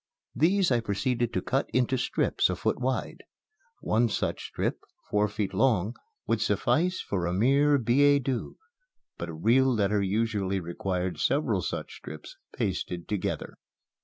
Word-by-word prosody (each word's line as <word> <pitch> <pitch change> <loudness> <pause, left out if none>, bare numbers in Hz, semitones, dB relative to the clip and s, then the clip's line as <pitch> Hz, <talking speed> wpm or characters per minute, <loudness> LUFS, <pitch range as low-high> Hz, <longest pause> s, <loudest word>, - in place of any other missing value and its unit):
These 180 +5 +3
I 120 - +4
proceeded 120 +3 -1
to - - -1
cut 135 +2 0
into 130 +1 +2
strips 125 - +1
a - - -1
foot - - -1
wide. 130 +1 -2 0.6
One 115 +2 +2
such - - -2
strip, - - -2 0.3
four 105 0 +3
feet 105 -1 -3
long, 110 -1 +2 0.3
would - - 0
suffice 180 +4 +1
for 90 -4 -2
a 85 - -1
mere 140 +7 +4
billet 140 +3 +4
doux; 125 -2 -3 0.6
but 85 - -4
a - - -6
real 125 +10 +3
letter 105 -3 +1
usually 100 -1 0
required 90 +1 -3
several 130 -8 +1
such - - -5
strips 75 0 -10 0.2
pasted 85 -1 -3
together. 105 -3 -3
115 Hz, 145 wpm, -28 LUFS, 100-130 Hz, 0.6 s, I